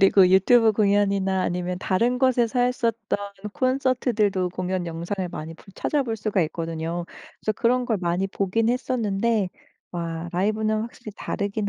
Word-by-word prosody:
그리고 195 -1 +6
유튜브 220 +5 +5
공연이나 200 -2 +2
아니면 180 +1 -2
다른 235 +7 +1
곳에서 250 -2 +2
했었던 230 -4 0 0.3
콘서트들도 250 -8 +1
공연 185 0 -2
영상을 175 +3 -3
많이 165 -1 -7
볼 - - -20
찾아볼 255 -7 -1
수가 210 -2 0
있거든요. 165 +1 -3 0.4
그래서 215 - 0
그런 250 +2 +1
걸 225 -3 0
많이 175 +2 0
보긴 200 +3 0
했었는데 230 -5 0 0.4
와 170 -1 -4
라이브는 215 +3 +1
확실히 230 -1 -8
다르긴 200 0 -2
205 Hz, 350 characters per minute, -24 LUFS, 180-230 Hz, 0.4 s, 그리고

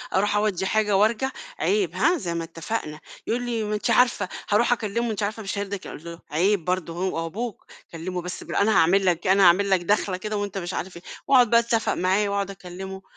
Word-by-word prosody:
أروح 205 +2 +2
أودّي 205 -3 0
حاجة 210 -1 +2
وأرجع، 230 +6 +2 0.3
عيب 405 -2 +1
ها 350 +3 +3
زي 175 - -4
ما 170 0 -2
اتفقنا، 165 -1 -5 0.3
يقول 240 +2 -1
لي 230 -2 -1
ما 210 0 -2
أنتِ 210 - -1
عارفة 245 -6 +3 0.2
هاروح 230 +4 +4
أكلِّمه 230 +1 -2
أنتِ 210 -1 -3
عارفة 215 +2 -3
مش 195 0 -4
هيرضى 200 0 -3
يكلّ 195 - -9
أقول 150 - -9
له 170 0 -8
عيب 180 +3 +1
برضه 180 -2 -1
هو 175 -1 -2
أبوك، 215 +5 -5 0.3
كلِّمه 180 +2 -4
بس 180 +1 -6
بال - - -6
أنا 205 +2 +3
هاعمل 190 +4 +4
لك 175 -2 +1
إيه، 185 - +4
أنا 195 0 +5
هاعمل 190 +3 +5
لك 190 -2 +3
داخلة 190 0 0
كده 210 +3 -4
وأنت 205 -1 -3
مش 175 -1 -4
عارف 180 -1 -5
إيه، 170 - -13 0.2
وأقعد 255 -4 +5
بقى 235 - +6
أتفق 230 -1 0
معاه 190 +3 +1
وأقعد 200 0 -1
أكلِّمه، 190 +1 -8
200 Hz, 225 wpm, -24 LUFS, 180-215 Hz, 0.3 s, بقى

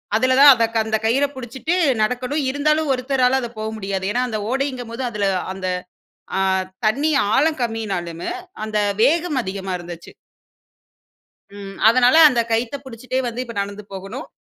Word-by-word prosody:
அதில 255 +3 +3
தான் 285 0 +11
அத 230 -2 +2 0.2
அந்தக் 220 0 -2
கயிற 260 +6 +3
புடிச்சிட்டு 260 +6 -3 0.3
நடக்கணும். 250 +6 -1
இருந்தாலும் 305 +2 +1
ஒருத்தரால 260 0 +1
அது 240 - -4
போ 215 - -4
முடியாது. 195 -2 -3
ஏன்னா 245 +3 0
அந்த 215 -2 -3
ஓடைங்கம்போது 260 -3 -3
அதில 205 -2 -1 0.3
அந்த 190 -1 -5 0.7
அ - - +1 0.5
தண்ணீ 280 +9 +1 0.2
ஆழம் 305 +2 +2
கம்மினாலுமே, 195 -8 -3 0.3
அந்த 215 -1 -2 0.2
வேகம் 325 0 +2
அதிகமா 190 -1 -5
இருந்துச்சு. 170 -1 -10 1.5
ம். 195 -1 -9
அதனால 250 +3 +4
அந்த 240 -4 +1
கயித்த 230 +3 0
பிடிச்சிட்டே 255 +1 -4
வந்து, 240 +1 -4
இப்ப 235 - -8
நடந்து 200 +1 -6
போகணும். 195 +6 -7
240 Hz, 140 wpm, -21 LUFS, 210-265 Hz, 1.5 s, தான்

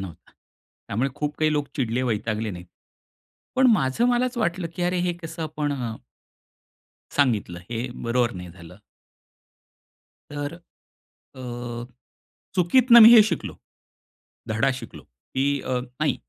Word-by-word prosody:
नव्हता. 95 -4 -10
त्यामुळे 120 +7 -6
खूप 150 0 -3
काही 155 -1 +2
लोक 145 -1 0
चिडले 125 -1 -1
वैतागले 110 -2 -2
नाहीत. 90 -1 -9 0.9
पण 260 - +5
माझं 135 - +1
मलाच 245 +1 +1
वाटलं, 175 -5 -1
की 180 - -2
अरे! 180 +1 0
हे 175 0 0
कसं 165 0 -6
आपण 150 -2 -2
अ 120 -5 -4 1.2
सांगितलं, 110 -11 0
हे 120 +1 -2 0.2
बरोबर 120 0 +1
नाही 90 -1 -8
झालं. 85 0 -14 1.6
तर 145 +2 -4
अ, 170 -5 -19 1.1
चुकीतनं 235 +7 +6
मी 225 +2 +10
हे 225 - +10
शिकलो, 200 -6 -3 0.9
धडा 115 +5 +1
शिकलो, - - -11
की 65 - -5 0.2
अ, - - -6
नाही, 130 +5 -2
135 Hz, 125 wpm, -24 LUFS, 115-175 Hz, 1.6 s, मी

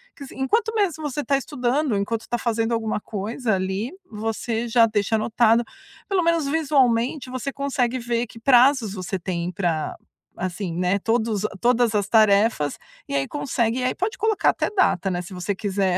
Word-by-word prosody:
que 280 - -9
sim - - -13
enquanto 445 - +1
mesmo 365 -7 0
você 290 +2 -3
tá 280 -1 +2
estudando, 270 -1 -1
enquanto 220 +3 -2
tá 240 - -1
fazendo 230 -1 -1
alguma 225 -2 -1
coisa 220 +3 -3
ali, 190 +6 -2 0.2
você 225 +2 -3
já 230 0 +5
deixa 215 0 0
anotado. 225 +1 +3 0.5
Pelo 390 -2 +2
menos 335 -2 +2
visualmente, 270 -4 +1
você 255 +2 -4
consegue 260 -3 -1
ver 240 0 -1
que 230 - -14
prazos 250 -3 +4
você 190 0 -4
tem 175 -1 -3
pra 170 -4 -2 0.4
assim, 185 +1 -3
né, 180 +2 +1
todos 225 -1 0 0.2
todas 240 -1 +2
as 205 -2 +1
tarefas 210 -7 +3 0.3
e 140 - -2
aí 135 -1 0
consegue. 245 -4 -1
E - - -2
aí 255 - 0
pode 395 +5 -2
colocar 435 -1 +2
até - - 0
data, 375 - +2
né, 175 -1 -2
se 185 +2 -10
você 180 +2 -3
quiser 195 -2 0
230 Hz, 175 wpm, -23 LUFS, 200-260 Hz, 0.5 s, já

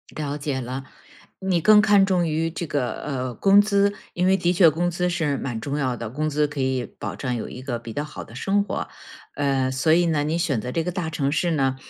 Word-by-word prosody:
了 145 -1 -3
解 140 -2 -3
了。 130 +2 -5 0.5
你 190 -3 0
更 215 +4 +7
看 205 -2 +5
重 185 -3 +2
于 160 +1 0
这 170 +1 -5
个， 140 -5 -1
呃， 130 -3 -3
工 200 +1 +6
资， 200 -1 +2 0.2
因 180 - 0
为 190 +1 +4
的 175 -1 +1
确 175 -1 +6
工 175 +4 0
资 180 +1 -1
是 160 -5 0
蛮 120 -4 -4
重 140 +3 -3
要 130 -4 0
的， 115 -2 -6
工 150 +6 -2
资 150 +1 +2
可 145 -1 -7
以 130 -1 0
保 - - -5
证 125 -3 -3
有 115 - -4
一 125 - -9
个 130 -2 -3
比 115 -1 -9
较 145 - -2
好 150 - -8
的 - - -15
生 195 - +1
活。 200 - -4 0.5
呃， 135 -2 +1
所 130 +5 +2
以 175 +1 +4
呢， 155 -3 +1
你 155 +3 -1
选 145 -9 0
择 125 +3 -5
这 165 - -1
个 180 - -2
大 170 -3 -3
城 140 -3 -1
市 170 +3 +1
呢， 135 -4 +1
150 Hz, 260 characters per minute, -23 LUFS, 130-175 Hz, 0.5 s, 更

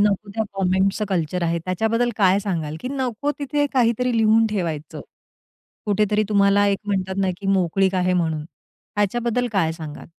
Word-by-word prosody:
नको 205 0 +1
त्या 220 -1 0
कमेंट्सचं 190 +2 +1
कल्चर 180 -1 -1
आहे 170 0 0
त्याच्याबद्दल 225 +6 0
काय 190 -1 +4
सांगाल, 160 -6 -3
की 250 - -4
नको 265 0 -2
तिथे 290 0 0
काहीतरी 245 -1 +2
लिहून 225 0 +4
ठेवायचं? 165 -7 -3 0.9
कुठेतरी 210 +1 +2
तुम्हाला 200 0 +4
एक 200 -1 +1
म्हणतात 190 -2 -1
ना 190 -1 +1
की 195 - -5
मोकळीक 190 0 +2
आहे 185 0 +1
म्हणून. 160 -4 0 0.5
ह्याच्याबद्दल 235 +4 0
काय 165 -5 +1
सांगाल? 155 -2 -8
200 Hz, 155 wpm, -22 LUFS, 185-225 Hz, 0.9 s, काय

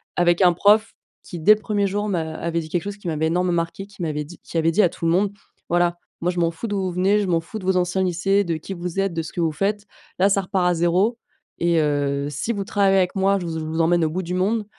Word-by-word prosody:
Avec 175 +1 +3
un 180 -1 +6
prof 210 +5 +3 0.3
qui 175 - -8
dès 185 +7 +7
le 215 - -11
1er 205 -2 0
jour 205 +2 -2
m'a 160 -4 -2
avait 170 0 -2
dit 155 - -9
quelque 175 +1 -1
chose 205 0 -6
qui 200 - -9
m'avait 160 -1 0
énormément 180 +2 +1
marqué, 170 +3 -2
qui 200 -2 -13
m'avait 150 -2 -2
dit 175 +4 -13
qui - - -5
avait 165 0 +2
dit 215 - +3
à 180 - +4
tout 165 - -7
le 165 - +3
monde: 195 +3 +2 0.4
«Voilà, 175 0 +2 0.2
moi, 175 - +1
je 175 - -4
m'en 170 -1 +2
fous 165 +7 -7
d'où 205 -2 -1
vous 185 -1 -2
venez, 190 +4 +2
je 205 - -1
m'en 170 -2 +1
fous 215 +6 -8
de 185 - -9
vos 190 0 +2
anciens 180 +1 0
lycées, 190 +3 +1
de 170 -3 -2
qui 175 +5 -7
vous 180 +1 -4
êtes, 195 -2 0
de 165 - -1
ce - - -8
que - - -5
vous 165 -1 +1
faites, 205 +5 -1 0.3
là, 195 +2 +5
ça 195 0 +2
repart 185 -1 0
à 180 - +2
0 180 +8 +1 0.4
et 170 -1 +2
heu, 145 -1 0
si 155 +11 -2
vous 200 -2 -3
travaillez 195 -2 +2
avec 180 -1 +1
moi, 195 +1 +2
je 180 - -5
vous 165 - -4
z 160 - -3
je 155 - -5
vous 160 +1 -1
emmène 170 +1 +3
au 155 - 0
bout 185 +2 -3
du 175 +2 -4
monde, 210 +4 0
180 Hz, 295 wpm, -22 LUFS, 165-195 Hz, 0.4 s, dès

